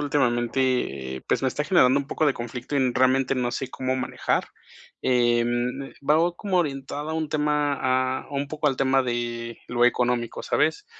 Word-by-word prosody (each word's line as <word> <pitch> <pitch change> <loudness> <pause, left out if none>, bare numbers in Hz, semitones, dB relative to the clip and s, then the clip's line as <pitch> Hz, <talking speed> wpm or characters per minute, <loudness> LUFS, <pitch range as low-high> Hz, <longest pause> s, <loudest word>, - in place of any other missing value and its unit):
últimamente, 120 - 0
pues, - - +1
me 130 - +3
está 145 - -2
generando 145 -6 +4
un 140 - -7
poco 155 - -1
de 145 - +4
conflicto, 120 +3 -6
y 130 -3 +2
realmente 130 +1 +3
no 125 -2 -1
sé 130 - -4
cómo 130 0 -2
manejar. 130 - -1 0.6
Eh, 120 -2 +3 0.6
va 160 +5 +3
como 195 -1 -1
orientada 145 -2 -2
a - - -2
un 160 -1 -2
tema 150 -1 +1
a 130 -1 0
a - - -18
un 140 0 -2
poco 155 0 -2
al 135 -3 +2
tema 135 0 +3
de 120 -1 -3
lo 120 0 +2
económico, 120 -1 +1
¿sabes? 415 - 0
130 Hz, 175 wpm, -25 LUFS, 120-145 Hz, 0.6 s, generando